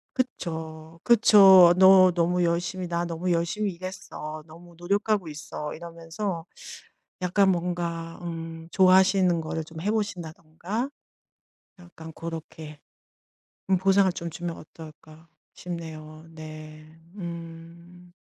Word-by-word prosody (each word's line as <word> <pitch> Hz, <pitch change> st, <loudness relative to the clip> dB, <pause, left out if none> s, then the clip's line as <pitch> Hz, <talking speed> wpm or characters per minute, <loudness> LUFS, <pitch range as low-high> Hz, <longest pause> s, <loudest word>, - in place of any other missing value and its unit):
그쵸. 160 Hz, -, -5 dB
그쵸. 195 Hz, -6 st, +8 dB
너 190 Hz, -1 st, +7 dB
너무 175 Hz, +1 st, +1 dB
열심히 175 Hz, +2 st, -1 dB
'나 170 Hz, 0 st, -2 dB
너무 170 Hz, +2 st, -2 dB
열심히 185 Hz, +4 st, -1 dB
일했어. 170 Hz, -4 st, -8 dB
너무 170 Hz, +2 st, -15 dB
노력하고 200 Hz, +1 st, -1 dB
있어.' 150 Hz, 0 st, -7 dB
이러면서 170 Hz, +2 st, -6 dB, 0.8 s
약간 190 Hz, +2 st, +3 dB
뭔가 170 Hz, -1 st, -3 dB
음 165 Hz, -1 st, -7 dB
좋아하시는 185 Hz, -2 st, +4 dB
거를 160 Hz, 0 st, -4 dB
좀 160 Hz, 0 st, -10 dB
해 205 Hz, +3 st, 0 dB
보신다든가 185 Hz, -, -4 dB, 0.9 s
약간 165 Hz, -2 st, -12 dB
고렇게 160 Hz, -2 st, -8 dB, 0.9 s
음 190 Hz, -, +5 dB
보상을 195 Hz, 0 st, +3 dB
좀 170 Hz, -1 st, -6 dB
주면 170 Hz, +1 st, -5 dB
어떨까 155 Hz, +1 st, -14 dB, 0.3 s
싶네요. 160 Hz, -2 st, -8 dB
네. 155 Hz, -1 st, -11 dB, 0.3 s
음. 170 Hz, 0 st, -10 dB
170 Hz, 230 characters per minute, -26 LUFS, 160-185 Hz, 0.9 s, 그쵸